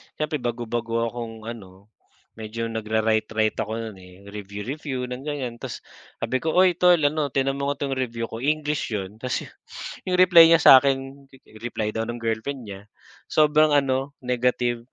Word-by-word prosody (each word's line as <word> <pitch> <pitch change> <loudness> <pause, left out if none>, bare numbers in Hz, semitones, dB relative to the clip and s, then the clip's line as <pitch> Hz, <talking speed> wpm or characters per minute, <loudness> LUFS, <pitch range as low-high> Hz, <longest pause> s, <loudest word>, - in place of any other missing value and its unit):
siyempre 150 0 -2
bago-bago 115 -1 -2
akong 115 -2 -7
ano, 100 -3 -10 0.5
medyo 115 +1 -4
nag-ra-write 110 0 0
write 110 -1 +1
ako 110 +1 -2
no'n, 95 - -15
eh, 90 +1 -16
review-review 110 +7 -5
ng 130 +4 -6
ganyan, 130 -5 -4
ta's - - -7 0.4
sabi 130 - 0
ko, 160 +2 -2
"Uy, 185 0 +6
tol 180 0 +6
ano, 150 0 +1
tingnan 135 +1 -1
mo 140 - -1
nga 140 0 -2
tong 140 - -2
review 115 -3 -3
ko." 115 - -6
English 150 -3 -1
'yon, 100 +2 -6
ta's 130 +1 -2 0.6
'yong 180 - +1
reply 175 -2 +8
niya 165 - +7
sa 135 - +10
akin, 135 0 -2 0.3
reply 110 -2 -3
daw 110 +1 -3
ng 120 - -4
Girlfriend 115 +3 -3
niya. 100 -1 -10 0.4
Sobrang 155 0 +4
ano, 135 0 0
negative. 125 -1 0
120 Hz, 165 wpm, -24 LUFS, 110-140 Hz, 0.6 s, sa